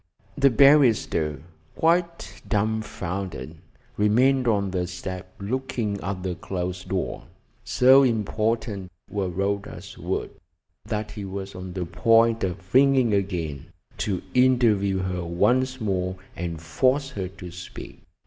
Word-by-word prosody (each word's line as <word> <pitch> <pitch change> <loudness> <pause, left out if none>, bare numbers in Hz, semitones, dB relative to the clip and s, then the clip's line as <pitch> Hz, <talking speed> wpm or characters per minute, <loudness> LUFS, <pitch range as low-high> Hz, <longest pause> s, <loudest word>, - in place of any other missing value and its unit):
The 140 0 +5
barrister, 115 - +4 0.3
quite 170 +1 0
dumbfounded, 100 - -2 0.4
remained 125 +5 +3
on 100 -4 +1
the 90 -1 -1
step 90 +1 -6
looking 110 -2 -2
at 95 -1 -4
the 95 -1 -2
closed 90 0 -5
door. 95 -2 -3 0.4
So 130 +2 +6
important 110 -4 -1 0.2
were 100 -3 -1
Rhoda's 100 +3 -4
words - - -3 0.5
that 105 0 -3
he 105 -1 -7
was 95 0 -6
on 95 -1 -7
the 90 -1 -3
point 115 +5 +3
of 95 0 -4
ringing 130 -3 +5
again, 85 -7 -2 0.3
to 95 -4 -1
interview 115 -7 +3
her 90 -1 -2
once 130 +10 +1
more 95 -4 -1 0.2
and 85 -2 -4
force 130 - +1
her 95 -7 -4
to 90 -1 -10
speak. 90 +1 -10
100 Hz, 120 wpm, -25 LUFS, 90-120 Hz, 0.5 s, So